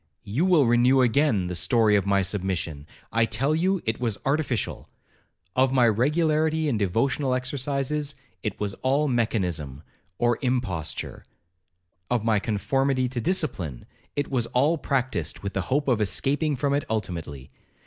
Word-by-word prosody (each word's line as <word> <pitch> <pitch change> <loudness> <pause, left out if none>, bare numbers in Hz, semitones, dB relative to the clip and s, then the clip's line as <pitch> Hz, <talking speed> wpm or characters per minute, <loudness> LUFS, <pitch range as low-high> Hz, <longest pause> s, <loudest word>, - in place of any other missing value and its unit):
—you 125 - 0
will 165 -7 +5
renew 120 +3 +4
again 120 -5 +2
the 90 - -4
story 110 +3 +3
of 100 -1 +1
my 100 -1 +3
submission—I 95 +1 -2
tell 130 +7 0
you 185 +4 +1
it 110 -1 -1
was 115 -4 -1
artificial;—of 130 - -2
my 125 -3 +4
regularity 155 +6 +2
in 135 - +1
devotional 125 - +1
exercises—it 135 - -3
was 100 -1 -2
all 140 +3 +2
mechanism 90 - -1 0.3
or 120 -1 +1
imposture;—of 90 - -5
my 110 -2 +3
conformity 130 +5 0
to 125 -1 -3
discipline—it 140 - -3
was 120 -4 -1
all 145 +7 +2
practised 125 - -2
with 100 -1 -4
the 100 - 0
hope 140 +2 +1
of 120 -5 +2
escaping 145 +8 +1
from 140 +2 0
it 145 0 +1
ultimately. 85 -11 -4
120 Hz, 130 wpm, -25 LUFS, 100-140 Hz, 0.3 s, will